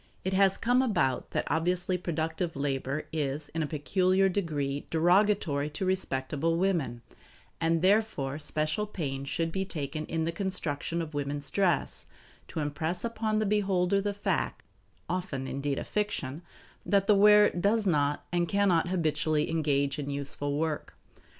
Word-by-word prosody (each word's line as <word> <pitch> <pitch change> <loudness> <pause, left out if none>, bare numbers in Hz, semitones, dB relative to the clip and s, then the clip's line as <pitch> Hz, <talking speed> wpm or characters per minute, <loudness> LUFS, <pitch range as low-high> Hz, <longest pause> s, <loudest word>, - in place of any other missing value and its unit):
It 190 - -1
has 195 0 +4
come 245 +2 +3
about 135 - 0
that - - -1
obviously 180 +3 +1
productive 165 0 -2
labor 140 +1 -2
is 145 -1 -2
in 165 - -3
a 155 - -1
peculiar 185 +6 +2
degree 145 -7 -2
derogatory 175 -3 +2
to 190 - -4
respectable 165 -3 0
women, 165 -11 0 0.6
and 165 0 +1
therefore 185 -9 +2
special 155 +6 -1
pains 140 -8 -4
should 165 +2 -1
be 190 +2 -1
taken 155 -4 -4
in 160 -1 -1
the 165 - 0
construction 170 -3 -2
of 155 -1 -8
women's 145 0 -2
dress, 185 -6 0 0.4
to 160 - -4
impress 160 +6 -2
upon 220 -2 -1
the 215 - +1
beholder 195 -2 +2
the 205 0 -2
fact 205 - -1 0.4
(often 180 -8 -3
indeed 140 +1 -2
a - - -2
fiction) 175 -9 -2 0.4
that 195 +2 +2
the 210 - +5
wearer 210 +1 +7
does 205 +5 +1
not 145 -5 +1
and 175 -1 +1
can 200 0 +3
not 170 -1 +3
habitually 155 -3 0
engage 145 -2 +1
in 145 -1 -4
useful 140 0 -2
work. 155 -1 -2
165 Hz, 150 wpm, -29 LUFS, 145-195 Hz, 0.6 s, wearer